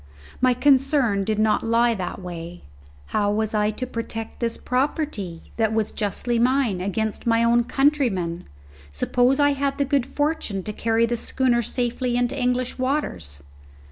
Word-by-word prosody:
My 255 -1 +4
concern 265 -5 +3
did 215 +1 -1
not 215 0 +2
lie 230 +1 +2
that 185 -5 -4
way; 175 -1 -8 0.5
how 205 -1 +2
was 220 +1 -1
I 210 0 +2
to 215 +4 -4
protect 230 -2 -6
this 230 -1 -1
property, 250 - -2
that 220 -1 +1
was 220 -1 0
justly 230 +3 -1
mine, 245 -6 +2
against 215 +4 -2
my 230 0 +3
own 235 0 +3
countrymen, 240 - +1 0.5
suppose 245 - +2
I 285 0 +5
had 280 0 -1
the 280 - +1
good 275 -2 +1
fortune 290 - -2
to 210 - -5
carry 225 +1 +1
the 240 +1 -1
schooner 245 0 +1
safely 245 +1 -1
into 245 +2 0
English 250 -1 -1
waters? 90 - -2
235 Hz, 155 wpm, -23 LUFS, 210-260 Hz, 0.5 s, I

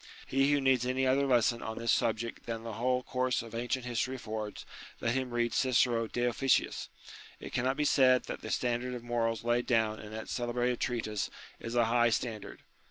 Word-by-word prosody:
He 135 +2 +2
who 145 - +3
needs 130 -3 +3
any 130 +1 0
other 135 +2 +3
lesson 120 -2 +3
on 110 0 -5
this 115 0 +1
subject 115 +1 -1
than 115 -1 -4
the 115 -1 -5
whole 125 0 +1
course 125 -2 0
of 115 -1 -11
ancient 120 +2 -2
history 125 +2 -1
affords, 110 -3 -5 0.3
let 115 - 0
him 130 -1 -1
read 120 -1 0
Cicero 120 -3 +2
de 120 - -3
Officiis. 125 +2 +1 0.5
It - - -9
cannot 130 +2 0
be 150 - +1
said 130 -3 +5
that - - -6
the - - -6
standard 125 +1 -1
of 120 - -7
morals 115 -2 -1
laid 120 +1 +1
down 110 -3 +2
in 105 - -9
that 110 0 -6
celebrated 120 0 -1
treatise 110 -4 -2 0.3
is 115 +1 -5
a 120 -1 +4
high 120 +1 +3
standard. 110 -2 -3
120 Hz, 195 wpm, -31 LUFS, 115-130 Hz, 0.5 s, said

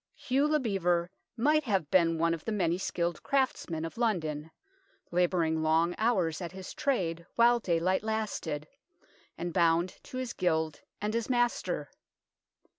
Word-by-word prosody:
Hugh 275 +3 +1
le 305 0 +2
Bevere 180 -7 +1 0.3
might 300 +5 +3
have 190 - 0
been 165 -3 +4
one 165 +1 +2
of 165 - -5
the 225 - -3
many 180 -4 +1
skilled 175 -2 -2
craftsmen 255 - 0
of 165 - -7
London, 160 -9 -1 0.6
labouring 170 -2 +2
long 160 +2 +3
hours 190 -8 +1
at 175 0 -5
his 190 -1 -8
trade 170 - -1
while 240 +1 +5
daylight 180 -1 +1
lasted, 210 -9 -3 0.7
and 175 0 -4
bound 170 0 +2
to 255 - -8
his 255 -2 -3
gild 160 -4 0 0.2
and 210 +1 -1
his 230 +1 -1
master. 240 - 0
180 Hz, 145 wpm, -30 LUFS, 165-225 Hz, 0.7 s, while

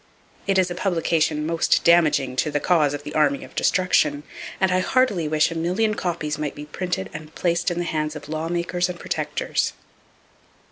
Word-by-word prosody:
It 195 -1 +2
is 185 -1 +2
a - - -1
publication 165 -4 0
most 165 +1 +2
damaging 150 -6 +4
to 155 - +1
the 145 0 0
cause 150 -4 +2
of 145 - -8
the 150 0 -7
Army 145 -3 +2
of - - -13
Destruction, 180 -5 +2 0.4
and 190 -1 +2
I 185 - +3
heartily 200 -5 +1
wish 155 +2 +2
a - - -5
million 185 +7 +1
copies 165 -6 -3
might 150 -2 -3
be 150 - -8
printed 150 - -3
and 155 0 -9
placed 175 +1 +1
in 175 - -3
the 175 - 0
hands 155 -1 -2
of 150 - -8
lawmakers 170 +3 -1
and 175 -1 -6
protectors. - - -2
165 Hz, 185 wpm, -23 LUFS, 150-180 Hz, 0.4 s, damaging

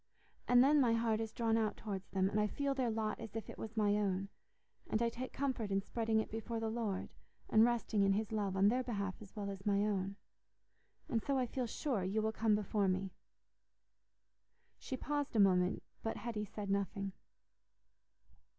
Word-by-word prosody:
And 245 0 +7
then 290 +2 +5
my 240 -3 +4
heart 230 -1 +1
is 225 -1 -3
drawn 225 -1 +1
out 220 -2 0
towards 195 -3 -5
them, 190 0 +2
and 205 +2 0
I 210 - +3
feel 280 +5 -1
their 260 -3 0
lot 220 -1 -1
as 225 -2 -8
if 225 - -4
it - - -12
was 220 0 -7
my 205 -1 +3
own, 195 -1 0 0.6
and 215 - +1
I 235 0 +2
take 255 +2 -6
comfort 260 -6 -1
in 195 0 +2
spreading 220 +2 0
it 220 - -3
before 225 +1 -3
the 225 -1 -1
Lord 220 -5 -3 0.4
and 220 - +7
resting 235 -3 +2
in 195 0 +4
His 215 +2 -1
love, 200 -3 -1
on 195 +1 +6
their 250 +3 +2
behalf 200 -6 -2
as 205 -2 -12
well 200 -2 -3
as 190 -1 -8
my 205 0 +2
own. 195 -2 -1 0.9
And 235 -7 0
so 275 +3 0
I 255 - +2
feel 250 0 -2
sure 240 -4 -1
you 195 +4 0
will 220 - +1
come 220 -1 +2
before 210 -1 +1
me." 185 +1 0 1.7
She 260 - -4
paused 290 -1 -2
a - - +4
moment, 185 -2 +4 0.2
but 225 - -2
Hetty 220 -3 -3
said 205 -1 -5
nothing. 200 0 -1
215 Hz, 195 wpm, -36 LUFS, 200-230 Hz, 1.7 s, And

